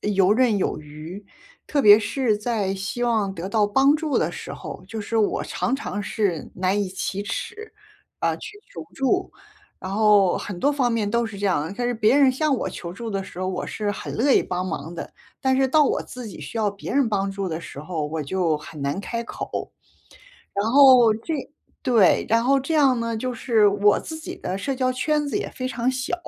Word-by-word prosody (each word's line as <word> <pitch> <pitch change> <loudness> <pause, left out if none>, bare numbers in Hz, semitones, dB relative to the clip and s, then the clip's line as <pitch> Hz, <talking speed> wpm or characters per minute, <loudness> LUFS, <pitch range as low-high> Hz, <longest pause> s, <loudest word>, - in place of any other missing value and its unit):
游 195 -1 +3
刃 235 -2 +3
有 185 - -1
余。 155 +6 -10 0.4
特 285 -2 +1
别 210 0 +9
是 225 +2 0
在 210 -4 -1
希 200 +5 -4
望 220 -5 +1
得 175 0 -5
到 210 +1 +2
帮 270 +8 +4
助 310 -2 -1
的 - - +1
时 - - -7
候， - - -8
就 220 -2 -5
是 225 +2 -1
我 210 - +1
常 260 - -1
常 205 -6 -4
是 195 -8 -2
难 190 +3 +1
以 190 - -3
启 190 +1 -3
齿， 435 - -6 0.5
呃， - - +1
去 425 -1 -9
求 - - -7
助。 275 +8 0 0.5
然 185 - -6
后 210 -3 +4
很 190 -4 -6
多 285 +9 +2
方 260 -4 +1
面 225 -3 0
都 235 +1 +1
是 215 -3 -8
这 205 - -4
样。 170 -3 0
但 245 0 -1
是 245 - +1
别 225 +3 +3
人 270 -3 +5
向 295 +1 +1
我 - - -3
求 170 - -7
助 225 +6 -6
的 195 -1 -2
时 185 - -11
候， 185 - -2
我 185 - -3
是 210 -1 -2
很 205 - -6
乐 265 +4 +3
意 - - +5
帮 180 0 -3
忙 165 -1 -5
的。 170 - -7 0.3
但 265 0 +3
是 265 0 +2
到 300 +2 +5
我 - - 0
自 250 -2 -9
己 205 - -9
需 - - -8
要 210 -2 +1
别 200 - -8
人 275 -3 +3
帮 200 -2 0
助 195 0 -3
的 160 +1 -3
时 140 - -10
候， 155 0 -3
我 155 +1 -3
就 165 +1 0
很 150 0 -10
难 140 +6 -2
开 230 +3 -3
口。 230 - -5 0.8
然 205 +3 0
后 255 -5 +7
这 225 +9 -5 0.5
对， 230 -8 +4
然 230 +1 +3
后 275 +2 +3
这 275 +5 -2
样 270 -5 +4
呢， 230 -1 -2
就 255 +3 -3
是 225 -3 +3
我 205 0 +3
自 320 - -7
己 355 +3 -7
的 190 - -4
社 275 +6 -2
交 255 -1 0
圈 295 +3 0
子 280 - -1
也 - - -3
非 255 - -5
常 245 0 0
小。 260 +5 -2
220 Hz, 235 characters per minute, -23 LUFS, 195-255 Hz, 0.8 s, 别